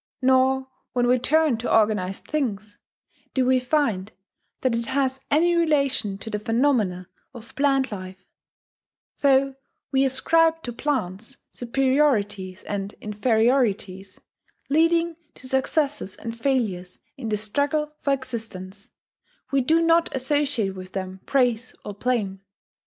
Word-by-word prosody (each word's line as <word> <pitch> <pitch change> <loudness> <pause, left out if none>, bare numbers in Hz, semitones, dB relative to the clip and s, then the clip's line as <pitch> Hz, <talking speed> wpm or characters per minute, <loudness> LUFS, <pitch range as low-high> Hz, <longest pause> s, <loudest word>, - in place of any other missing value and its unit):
Nor, 260 0 +3 0.3
when 245 -1 +2
we 250 +1 +3
turn 310 -1 +3
to 230 - -3
organized 210 -4 +1
things, 215 -8 -3 0.6
do 260 -2 +2
we 255 0 +4
find 250 -7 0 0.5
that 255 -3 +1
it 230 0 -2
has 265 -1 0
any 340 +4 +3
relation 280 -11 +1
to 220 +3 -7
the 210 - -2
phenomena 225 -6 +1 0.3
of 230 -1 -12
plant 270 -2 +2
life; 185 -2 -8 0.9
though 275 -1 +3 0.4
we 270 0 +3
ascribe 325 +5 +2
to 240 - -5
plants 235 -3 -3
superiorities 235 -7 0
and 200 0 -4
inferiorities, 210 -3 0 0.5
leading 330 +2 +2 0.2
to 260 - -8
successes 265 -4 0
and 230 0 -6
failures 225 -8 -1 0.2
in 255 -6 -5
the 210 - 0
struggle 290 +8 -1
for 280 - 0
existence, 220 -7 -5 0.6
we 275 -1 +3
do 320 +6 +3
not 330 +1 +4
associate 265 -5 0
with 185 -1 -10
them 190 -1 -5
praise 245 -3 +1
or 205 - -5
blame. 200 -4 -1
250 Hz, 125 wpm, -24 LUFS, 205-275 Hz, 0.9 s, we